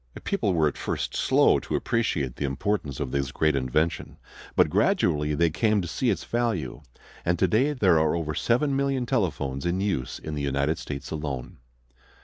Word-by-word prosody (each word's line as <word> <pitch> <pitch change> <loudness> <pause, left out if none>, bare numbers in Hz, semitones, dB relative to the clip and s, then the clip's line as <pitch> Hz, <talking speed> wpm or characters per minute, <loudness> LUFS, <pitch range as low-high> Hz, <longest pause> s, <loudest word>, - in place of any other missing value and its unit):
People 95 - 0
were 80 -2 +3
at 75 - -4
first - - -3
slow - - +4
to - - -4
appreciate 75 - -1
the - - -3
importance 70 +1 -2
of 65 -3 -3
this 70 -1 -1
great 80 0 +1
invention: 70 +5 -1 0.4
but - - +5
gradually 75 0 +1
they 85 +1 +2
came 105 +5 +2
to 90 - -3
see 120 +8 0
its 100 - 0
value, 120 -9 -2 0.4
and 85 +1 +1
today 110 - +2
there 95 - +4
are 80 +1 +2
over 80 -2 -2
seven 135 - +1
million 135 -2 0
telephones 80 - -1
in 85 +2 0
use 95 -11 -2
in 75 - -7
the 75 - -3
United 70 +3 0
States 70 -2 -6
alone. 70 -5 -5
80 Hz, 175 wpm, -26 LUFS, 70-105 Hz, 0.4 s, but